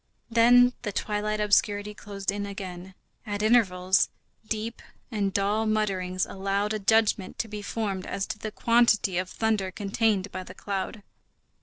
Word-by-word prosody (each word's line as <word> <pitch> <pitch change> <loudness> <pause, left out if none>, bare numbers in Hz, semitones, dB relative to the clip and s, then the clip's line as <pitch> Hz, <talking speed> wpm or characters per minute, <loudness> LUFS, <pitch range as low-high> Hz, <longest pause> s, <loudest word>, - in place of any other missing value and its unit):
Then 245 +2 +6
the 210 - -3
twilight 210 +1 -2
obscurity 205 0 +2
closed 200 -1 -4
in 200 0 -4
again. 185 -2 -7 0.3
At 205 -2 -3
intervals, 190 -5 +3 0.4
deep 225 +1 -3 0.3
and 200 -3 0
dull 205 +3 +1
mutterings 190 -4 0
allowed 200 +2 -1
a 215 - -2
judgment 210 -2 +2
to 225 - -2
be 210 -1 -6
formed 200 -3 -3
as 195 -1 -2
to 210 - -6
the 215 - -4
quantity 225 -5 +3
of 185 0 -3
thunder 215 -3 0
contained 205 0 0
by 185 - -5
the 185 0 -11
cloud. 200 +2 -4
205 Hz, 150 wpm, -27 LUFS, 195-220 Hz, 0.4 s, Then